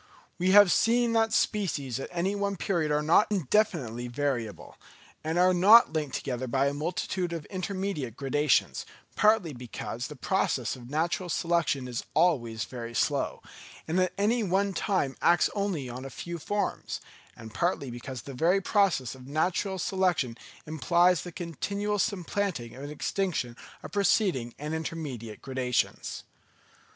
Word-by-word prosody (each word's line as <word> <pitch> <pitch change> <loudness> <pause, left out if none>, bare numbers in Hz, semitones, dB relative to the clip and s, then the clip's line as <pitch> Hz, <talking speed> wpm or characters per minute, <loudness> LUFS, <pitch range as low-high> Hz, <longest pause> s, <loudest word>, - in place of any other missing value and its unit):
We 180 +1 +2
have 200 -1 +8
seen 235 +1 +3
that 225 -1 +3
species 150 - 0
at - - -5
any 180 +3 0
one 200 -1 -1
period 170 -4 0
are 150 0 +1
not 165 +7 +5
indefinitely 155 - 0
variable, 120 -4 -3 0.5
and 160 +2 -1
are 180 +1 +5
not 200 +2 +7
linked 150 -4 -2
together 130 0 -3
by 135 +3 +1
a 140 - +1
multitude 175 +3 -2
of 165 -3 -5
intermediate 185 - -3
gradations, 140 +1 +1 0.3
partly 210 -7 +3
because 120 -1 -6
the 150 - -9
process 135 - 0
of 120 -1 -12
natural 170 +4 -1
selection 165 -6 0
is 125 0 -4
always 125 -10 +2
very 120 -2 -7
slow, - - 0 0.4
and 165 +3 +1
at 185 -1 +2
any 220 +4 +2
one 195 0 +1
time 170 -7 0
acts 170 -1 +4
only 200 -10 -2
on 125 +1 -7
a 135 - -6
few 170 +4 -6
forms; 205 +4 -2 0.4
and 110 -1 -10
partly 170 -6 -1
because 120 +1 -7
the 140 - -8
very 170 +9 +3
process 195 - +1
of 130 -1 -13
natural 180 +6 0
selection 180 -10 0 0.3
implies 170 +3 +3
the 175 - -7
continual 200 +5 -3
supplanting 185 - -1
and 140 +2 -7
extinction 150 -5 -2 0.3
of - - -8
preceding 185 - +1
and 150 +2 -4
intermediate 145 -9 -5
gradations. 130 -2 -1
165 Hz, 145 wpm, -28 LUFS, 130-190 Hz, 0.5 s, have